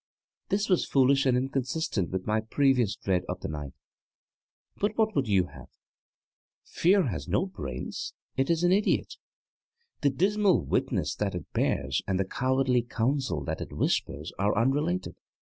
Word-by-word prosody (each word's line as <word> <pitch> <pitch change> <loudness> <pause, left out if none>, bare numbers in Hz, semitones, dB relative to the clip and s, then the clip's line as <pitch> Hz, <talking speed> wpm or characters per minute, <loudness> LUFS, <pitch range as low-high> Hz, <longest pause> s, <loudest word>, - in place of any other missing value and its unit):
This 205 +1 +1
was 185 -3 +2
foolish 135 0 +4
and 125 -1 +4
inconsistent 130 - -1
with 95 0 -3
my 110 +1 +1
previous 125 -2 +2
dread 95 -2 0
of 90 +1 -4
the - - -3
light, 75 -3 -6 1.0
but 205 +1 -1
what 220 -2 +2
would 135 -3 +1
you 95 -3 +3
have? - - -12 1.0
Fear 185 -4 +3
has 75 -8 -5
no 100 - +1
brains; 65 - -6 0.2
it 135 0 0
is 170 0 +2
an 175 - +4
idiot. 205 +2 +1 0.8
The 145 - +4
dismal 195 +6 +2
witness - - 0
that - - -1
it - - -7
bears 65 -2 0
and 95 -1 0
the 95 - +1
cowardly 130 +3 +1
counsel 120 - -1
that - - -4
it - - -6
whispers 75 +4 -1
are 100 +1 +1
unrelated. 145 - 0
130 Hz, 155 wpm, -28 LUFS, -, 1.0 s, foolish